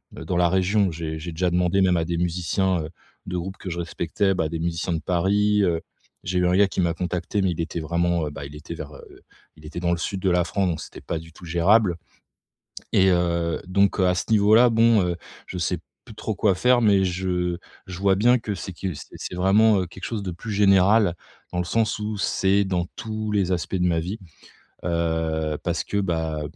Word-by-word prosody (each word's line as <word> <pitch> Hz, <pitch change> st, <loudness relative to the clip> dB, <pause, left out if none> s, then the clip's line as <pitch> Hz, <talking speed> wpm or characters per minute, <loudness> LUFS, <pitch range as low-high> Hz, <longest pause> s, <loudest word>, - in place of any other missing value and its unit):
heu, -, -, -8 dB
dans 90 Hz, -, -2 dB
la 90 Hz, -1 st, +4 dB
région. 95 Hz, +2 st, +2 dB
J'ai 80 Hz, -1 st, -5 dB
j'ai 85 Hz, +2 st, -6 dB
déjà 90 Hz, +2 st, 0 dB
demandé 90 Hz, +2 st, +2 dB
même 90 Hz, -1 st, +3 dB
à 80 Hz, -, 0 dB
des 85 Hz, 0 st, -2 dB
musiciens, 90 Hz, +1 st, 0 dB
heu, 75 Hz, -, -6 dB, 0.4 s
de 90 Hz, -, -2 dB
groupes 95 Hz, +2 st, -5 dB
que 95 Hz, -, -7 dB
je 85 Hz, -, -4 dB
respectais, 95 Hz, +3 st, -1 dB
bah, 80 Hz, -4 st, -1 dB
des 85 Hz, -, -3 dB
musiciens 85 Hz, +2 st, -2 dB
de 80 Hz, -, -1 dB
Paris, 105 Hz, +4 st, +2 dB
heu, 85 Hz, -3 st, +1 dB, 0.4 s
j'ai 90 Hz, +1 st, -1 dB
eu 90 Hz, -, +2 dB
1 90 Hz, -, +2 dB
gars 100 Hz, 0 st, +5 dB
qui 95 Hz, -, -2 dB
m'a 85 Hz, -1 st, +1 dB
contacté 90 Hz, +3 st, -2 dB
mais 95 Hz, -, +2 dB
il 85 Hz, -, -3 dB
était 85 Hz, 0 st, -4 dB
vraiment, 85 Hz, +1 st, 0 dB
heu, -, -, -5 dB
bah, 70 Hz, -1 st, -7 dB
il 75 Hz, -, -12 dB
était 75 Hz, +3 st, -8 dB
vers, 75 Hz, -3 st, -8 dB
heu -, -, -14 dB, 0.4 s
il 75 Hz, -, -17 dB
était 80 Hz, +3 st, -6 dB
dans 85 Hz, -1 st, +1 dB
le 85 Hz, -, +1 dB
sud 95 Hz, +3 st, -3 dB
de 95 Hz, -, +2 dB
la 90 Hz, 0 st, +3 dB
France 95 Hz, +2 st, 0 dB
donc 85 Hz, -, -3 dB
c'était -, -, -10 dB
pas 85 Hz, -, -3 dB
du 80 Hz, 0 st, -13 dB
tout 90 Hz, -, -13 dB
gérable. 90 Hz, +3 st, +3 dB, 1.0 s
Et, 95 Hz, 0 st, +5 dB
heu, 85 Hz, -2 st, 0 dB
donc, 100 Hz, +2 st, +2 dB
heu, 95 Hz, -, +4 dB
à 90 Hz, -, +2 dB
ce 90 Hz, -, -2 dB
niveau-là, 110 Hz, +3 st, +5 dB
bon, 115 Hz, -2 st, +4 dB
heu, 90 Hz, -1 st, -1 dB, 0.3 s
je 90 Hz, -, -6 dB
sais 90 Hz, +1 st, 0 dB, 0.3 s
plus 115 Hz, -, -11 dB
trop 110 Hz, +1 st, -4 dB
quoi 100 Hz, 0 st, +2 dB
faire 125 Hz, +6 st, +3 dB
mais 100 Hz, -3 st, +4 dB
je 90 Hz, -1 st, -1 dB, 0.3 s
je 90 Hz, -2 st, -7 dB
vois 100 Hz, 0 st, +3 dB
bien 120 Hz, +5 st, +4 dB
que 110 Hz, -3 st, -4 dB
c'est 95 Hz, 0 st, -6 dB
que 90 Hz, 0 st, -4 dB
c'est -, -, -10 dB
c'est -, -, -6 dB
vraiment, 100 Hz, +3 st, +4 dB
heu, 90 Hz, -, -2 dB
quelque 90 Hz, +1 st, -10 dB
chose 110 Hz, -3 st, -3 dB
de 95 Hz, -, -3 dB
plus 105 Hz, +6 st, -7 dB
général. 100 Hz, -1 st, +4 dB, 0.4 s
Dans 90 Hz, -, -2 dB
le -, -, -1 dB
sens 110 Hz, +3 st, 0 dB
où 105 Hz, 0 st, -3 dB
c'est 100 Hz, +1 st, +2 dB
dans 90 Hz, -3 st, -1 dB
tous 110 Hz, -1 st, -4 dB
les 95 Hz, -3 st, +1 dB
aspects 90 Hz, +1 st, -2 dB
de 90 Hz, -1 st, +1 dB
ma 85 Hz, -2 st, +1 dB
vie, 95 Hz, +7 st, -5 dB, 0.7 s
heu, 80 Hz, -2 st, -1 dB
parce -, -, -1 dB
que, 100 Hz, -, -3 dB
bah, 80 Hz, -5 st, -1 dB
90 Hz, 235 wpm, -24 LUFS, 85-100 Hz, 1.0 s, gars